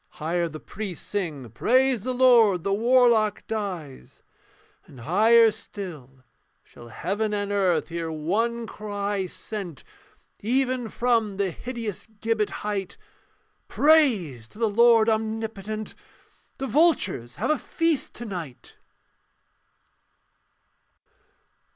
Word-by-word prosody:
Higher 170 +1 -1
the 155 0 -8
priests 195 -2 -7
sing, 160 -11 -4
'Praise 255 - +2
the 255 +5 -3
Lord, 235 -8 +5
The 195 - 0
warlock 230 -1 +3
dies'; 185 -11 -6 0.6
and 125 - -13
higher 220 - +5
still 150 -12 -9 0.4
Shall 120 - -15
heaven 205 - -2
and 205 0 -2
earth 190 -4 +1
hear 165 -1 -4
one 225 +10 -1
cry 205 -2 -3
sent 185 -5 -7 0.6
Even 250 +1 0
from 225 -5 0
the 195 -2 0
hideous 230 -1 -6
gibbet 225 -1 0 0.2
height, 200 -3 -3 0.7
'Praise 220 - +3
to - - -17
the 230 0 +1
Lord 230 +1 +5
Omnipotent, 220 -1 -2 0.6
The 270 - -3
vultures 260 - +1
have - - 0
a 305 - +1
feast 330 -3 -1
to 240 - -7
night.' 170 - -8
210 Hz, 110 wpm, -25 LUFS, 175-235 Hz, 0.7 s, Lord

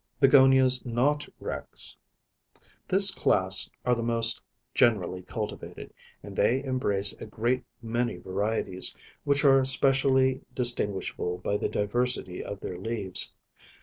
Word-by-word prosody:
BEGONIAS, 130 -2 +4
NOT 135 +5 -1
REX. - - -5 0.9
This 195 +1 +6
class 95 - +2 0.2
are 125 - +2
the 120 - -3
most 115 0 +2 0.3
generally 95 -5 0
cultivated, 105 +3 -8 0.3
and 100 -1 -11
they 130 +7 0
embrace 105 -7 0
a - - -8
great 120 +4 -2 0.2
many 120 -2 -3
varieties, 95 0 -2 0.3
which 140 0 0
are 135 -1 +4
specially 130 0 +1
distinguishable 100 -7 -1
by 95 +3 -4
the - - -3
diversity 105 -3 -2
of 100 - -8
their 90 - -7
leaves. 100 -3 +6
120 Hz, 115 wpm, -26 LUFS, 100-130 Hz, 0.9 s, This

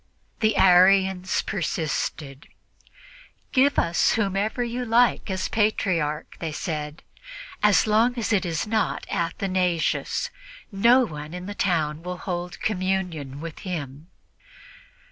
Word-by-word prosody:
The 215 -4 +2
Arians 190 0 +4
persisted. 150 -5 -3 1.0
"Give 280 +1 +3
us 170 0 +2
whomever 210 +3 0
you 240 +1 -3
like 235 -1 +2
as 185 -1 -2
Patriarch," 180 -8 -1
they 165 -2 -3
said, 150 -2 -5 0.6
"as 210 -4 +4
long 225 +3 +2
as 225 -1 -1
it 195 - +2
is 165 0 -2
not 215 0 -1
Athanasius. 180 -1 -1 0.4
No 235 +6 +4
one 150 -2 -8
in 180 0 -7
the 205 - -5
town 160 -6 0
will 180 +1 -5
hold 175 -1 -5
communion 180 -8 -2
with 165 -1 -7
him." 155 -5 -6
185 Hz, 115 wpm, -24 LUFS, 165-210 Hz, 1.0 s, Arians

